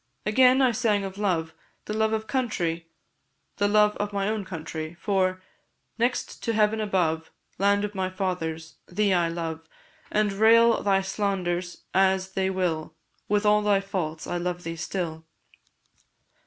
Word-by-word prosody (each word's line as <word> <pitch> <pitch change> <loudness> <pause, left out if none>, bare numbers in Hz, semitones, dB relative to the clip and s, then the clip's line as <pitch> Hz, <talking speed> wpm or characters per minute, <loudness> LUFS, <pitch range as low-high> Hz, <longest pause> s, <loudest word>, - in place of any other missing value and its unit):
Again, 255 +4 +5
I 255 - +4
sang 220 -3 +1
of 195 0 -6
love 165 -6 0 0.3
the 210 - -4
love 220 0 +1
of 220 0 -1
country, 180 -9 -2 0.7
the 205 - +2
love 210 0 +4
of 205 0 -2
my 200 -1 -1
own 215 -1 -1
country; 160 -2 -6
for, 185 -2 0 0.6
'Next 245 +2 -1
to 230 - -1
heaven 215 0 +2
above, 170 -6 0 0.3
Land 200 +1 +3
of 210 - -6
my 190 -1 -1
fathers! 165 -4 -4
thee 200 +2 +1
I 170 -2 +2
love; 165 -1 -5 0.4
And, 210 -1 +1
rail 230 +3 +5
thy 195 -1 +2
slanderers 185 -3 -2
as 190 0 +2
they 190 0 0
will, 180 -4 -2 0.3
With 210 +1 +2
all 210 0 +5
thy 205 -1 +3
faults 175 -5 -4
I 175 - -2
love 175 0 -3
thee 165 0 -4
still.' 160 -1 -4
195 Hz, 155 wpm, -26 LUFS, 175-210 Hz, 0.7 s, Again